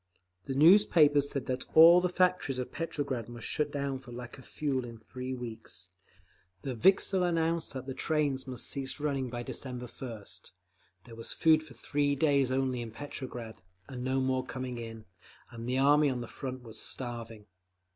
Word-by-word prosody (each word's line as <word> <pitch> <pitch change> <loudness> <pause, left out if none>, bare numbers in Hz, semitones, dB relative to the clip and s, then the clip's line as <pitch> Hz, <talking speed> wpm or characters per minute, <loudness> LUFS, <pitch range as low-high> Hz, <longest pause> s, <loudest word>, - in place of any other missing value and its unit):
The 135 - -3
newspapers 150 -3 +6
said 140 -3 -3
that 130 0 -2
all 170 +2 +9
the 180 - +1
factories 180 -7 +1
of 125 - -4
Petrograd 140 -8 -3
must 120 -1 -8
shut 150 - 0
down 140 -2 -2
for 130 -2 -13
lack 120 +2 -8
of 130 - -14
fuel 140 -4 -1
in 115 -1 -8
three 130 +3 -6
weeks; 120 -3 -8 0.7
the 135 - -3
Vikzhel 190 - +4
announced 165 -3 0
that 130 0 -5
trains 145 -4 0
must 125 -3 -1
cease 135 +1 -2
running 140 -3 -1
by 120 0 -5
December 125 0 -4
first; 115 -5 -9 0.5
there 115 - -12
was 115 - -5
food 160 -1 +4
for 150 -6 -14
three 145 +4 0
days 140 -2 +3
only 130 -2 0
in 115 - -5
Petrograd, 120 -3 -7 0.3
and 125 -2 -6
no 130 +1 +1
more 130 -1 0
coming 130 -2 -5
in; 115 -1 -8 0.5
and 115 0 -6
the 130 - +1
Army 145 +2 +5
on 125 -2 -2
the 120 - -6
Front 130 -1 -6
was 110 -2 -5
starving…. 115 -4 -5
130 Hz, 175 wpm, -30 LUFS, 120-145 Hz, 0.7 s, all